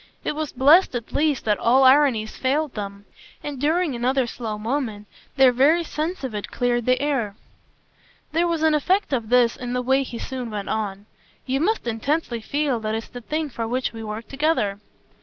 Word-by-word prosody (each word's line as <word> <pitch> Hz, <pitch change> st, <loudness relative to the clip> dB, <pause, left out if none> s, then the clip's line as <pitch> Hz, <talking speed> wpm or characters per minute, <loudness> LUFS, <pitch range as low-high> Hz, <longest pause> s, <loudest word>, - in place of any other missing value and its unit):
It -, -, -2 dB
was 310 Hz, -1 st, -3 dB
blest 290 Hz, +5 st, +5 dB
at 235 Hz, -2 st, -5 dB
least 295 Hz, -3 st, +1 dB
that 210 Hz, -2 st, +1 dB
all 255 Hz, +3 st, +4 dB
ironies 260 Hz, -5 st, +4 dB
failed 285 Hz, +2 st, 0 dB
them, 200 Hz, -1 st, -6 dB, 0.4 s
and 285 Hz, -3 st, -5 dB
during 320 Hz, +1 st, +1 dB
another 255 Hz, +2 st, +1 dB
slow 225 Hz, -2 st, -5 dB
moment 220 Hz, -2 st, -3 dB, 0.3 s
their 265 Hz, -1 st, +7 dB
very 290 Hz, +8 st, +3 dB
sense 320 Hz, +2 st, -4 dB
of 260 Hz, -4 st, -4 dB
it 205 Hz, -1 st, -5 dB
cleared 240 Hz, -1 st, -1 dB
the 255 Hz, 0 st, +3 dB
air. 265 Hz, -8 st, -1 dB, 1.0 s
There 335 Hz, +2 st, +2 dB
was 330 Hz, -2 st, -1 dB
an 315 Hz, -1 st, +4 dB
effect 365 Hz, +3 st, +1 dB
of 230 Hz, -4 st, -1 dB
this 245 Hz, -1 st, +4 dB
in 245 Hz, -1 st, -5 dB
the 250 Hz, -, 0 dB
way 265 Hz, +2 st, +3 dB
he 250 Hz, -3 st, -5 dB
soon 250 Hz, -1 st, -5 dB
went 205 Hz, -2 st, -5 dB
on. 205 Hz, -2 st, -3 dB, 0.4 s
"You 265 Hz, +1 st, 0 dB
must 425 Hz, -, 0 dB
intensely 235 Hz, +2 st, -1 dB
feel 280 Hz, +1 st, -1 dB
that 215 Hz, 0 st, -2 dB
it's 225 Hz, -, -5 dB
the 245 Hz, -, -9 dB
thing 305 Hz, +4 st, -3 dB
for 230 Hz, -1 st, -3 dB
which 250 Hz, +2 st, -2 dB
we 225 Hz, 0 st, -7 dB
worked 215 Hz, +1 st, -6 dB
together." 270 Hz, -9 st, 0 dB
255 Hz, 195 wpm, -23 LUFS, 225-295 Hz, 1.0 s, their